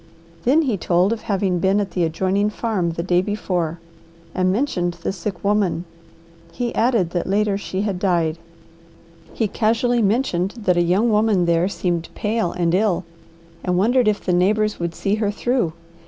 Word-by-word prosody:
Then 295 +7 +4
he 245 -8 0
told 180 +4 +2
of 230 - -6
having 190 -3 0
been 195 +3 +2
at 200 -3 -2
the 175 0 0
adjoining 190 +5 +1
farm 210 -6 -1
the 170 - -3
day 180 0 +2
before 180 -5 -2 0.5
and 185 0 +1
mentioned 190 -7 0
the 175 +2 -4
sick 200 -2 -5
woman. 200 -4 +1 0.7
He 240 +3 -3
added 225 -8 +1
that 175 -1 -2
later 205 0 +2
she 195 -1 -3
had 200 -4 -2
died. 170 -4 +1 1.0
He 220 - +1
casually 230 +3 +1
mentioned 200 -3 0
that 195 -5 +1
a 175 - +3
young 190 +7 +2
woman 210 -4 +3
there 170 +1 +2
seemed 175 -4 -2
pale 215 -4 -1
and 170 -1 0
ill 190 -2 +2 0.6
and 180 -1 0
wondered 240 +5 +3
if 210 -1 0
the 180 - +1
neighbours 210 +4 +2
would 170 -1 -3
see 195 - -1
her 205 - +1
through. 240 -3 0
195 Hz, 170 wpm, -21 LUFS, 175-215 Hz, 1.0 s, Then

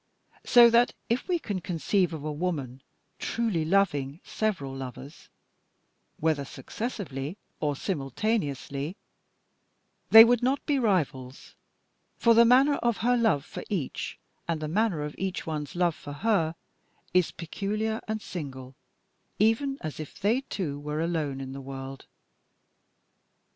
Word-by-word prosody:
So 235 -1 +8
that, 235 +1 +4
if 235 +3 0
we 360 -2 +2
can 205 - -4
conceive 180 +1 0
of 155 -3 -6
a 155 - -2
woman 145 -6 -3 0.4
truly 220 -9 0
loving 155 -5 +1
several 180 -12 -2
lovers, 135 +3 -9 0.9
whether 155 -3 +1
successively 170 - -5 0.2
or 145 -2 0
simultaneously, 145 - -2 1.1
they 225 0 +11
would 240 0 +3
not 260 +3 0
be 290 -3 +2
rivals, 150 - -1 0.6
for 235 - +5
the 235 +1 +7
manner 265 +4 +5
of 235 -2 0
her 245 0 +4
love 220 - +2
for - - -7
each, 180 -10 -3 0.3
and 165 -2 -1
the 155 - -3
manner 185 -2 +1
of 150 0 -5
each 190 -1 -3
one's 150 -1 -4
love 175 -1 +2
for 145 -1 -9
her, 170 -2 +1 0.6
is 180 -2 +4
peculiar 215 +6 -3
and 215 0 -3
single, 135 -6 -7 0.6
even 230 +6 +2
as 155 -3 -5
if 155 - -8
they 215 +6 +2
two 160 - -4
were 150 +1 -4
alone 160 -5 -1
in 135 -1 -6
the 135 - -7
world. 135 0 -8
170 Hz, 135 wpm, -28 LUFS, 145-220 Hz, 1.1 s, they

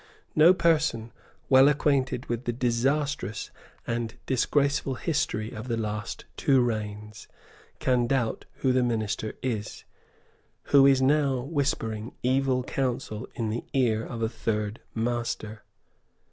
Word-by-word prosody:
No 160 +3 +8
person 160 -10 +1 0.4
well 130 +1 +7
acquainted 140 -3 +1
with 120 +1 -3
the 120 - 0
disastrous 125 -1 -1 0.3
and 115 -1 -3
disgraceful 140 +1 +1
history 145 -8 -1
of 105 +4 -7
the 115 -2 -1
last 105 -1 -4
two 135 -2 +3
reigns 105 -3 -3 0.5
can 125 -2 +1
doubt 125 -3 -1 0.2
who 130 - +4
the 130 - +3
minister 110 -3 -1
is, 110 -5 -3 0.8
who 140 -1 +6
is 135 -1 +4
now 140 -2 +2
whispering 125 -6 -2
evil 130 0 +2
counsel 125 -4 -3
in 115 -4 -2
the 120 - -3
ear 115 -5 +2
of 115 -1 -5
a - - +2
third 105 -2 -3
master." 115 -2 -2
120 Hz, 125 wpm, -27 LUFS, 110-135 Hz, 0.8 s, No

